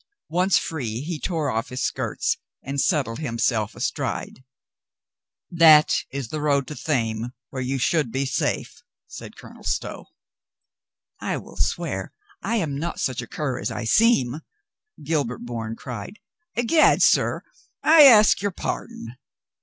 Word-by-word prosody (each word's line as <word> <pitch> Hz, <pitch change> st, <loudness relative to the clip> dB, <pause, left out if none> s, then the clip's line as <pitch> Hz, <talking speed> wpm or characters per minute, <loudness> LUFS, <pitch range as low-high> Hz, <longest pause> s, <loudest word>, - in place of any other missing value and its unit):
Once 180 Hz, +3 st, +3 dB
free, 120 Hz, -7 st, -3 dB
he 160 Hz, +1 st, -4 dB
tore 155 Hz, -5 st, -1 dB
off 115 Hz, 0 st, -2 dB
his 125 Hz, -, -4 dB
skirts -, -, -1 dB, 0.3 s
and 140 Hz, +1 st, -2 dB
settled 140 Hz, -8 st, 0 dB
himself 115 Hz, -5 st, -1 dB
astride. 130 Hz, -, -3 dB, 1.1 s
"That 160 Hz, -3 st, +6 dB
is 135 Hz, -4 st, -5 dB
the 155 Hz, -, -4 dB
road 140 Hz, -2 st, +1 dB
to 150 Hz, -, -6 dB
Thame, 120 Hz, -6 st, -2 dB, 0.2 s
where 130 Hz, -, -4 dB
you 130 Hz, +2 st, -2 dB
should 135 Hz, -1 st, +1 dB
be 135 Hz, +3 st, -1 dB
safe," 135 Hz, -, -2 dB, 0.2 s
said -, -, -10 dB
Colonel -, -, -13 dB
Stow. -, -, -3 dB, 1.1 s
"I -, -, -2 dB
will -, -, -11 dB
swear -, -, -2 dB, 0.3 s
I 230 Hz, -, -1 dB
am 155 Hz, -10 st, -1 dB
not 170 Hz, +3 st, -4 dB
such 130 Hz, -2 st, -1 dB
a 120 Hz, -, -9 dB
cur 135 Hz, -2 st, -3 dB
as -, -, -2 dB
I -, -, -5 dB
seem," 135 Hz, -, +3 dB, 0.6 s
Gil 155 Hz, 0 st, +1 dB
bert 120 Hz, 0 st, -7 dB
Bourne 115 Hz, -2 st, -5 dB
cried. 125 Hz, -, -8 dB, 0.4 s
"I'gad, 280 Hz, +7 st, +4 dB
sir, -, -, +3 dB, 0.4 s
I 315 Hz, 0 st, +7 dB
ask 215 Hz, -6 st, +7 dB
your 205 Hz, -, 0 dB
pardon." 125 Hz, -9 st, -6 dB
140 Hz, 145 wpm, -23 LUFS, 120-165 Hz, 1.1 s, I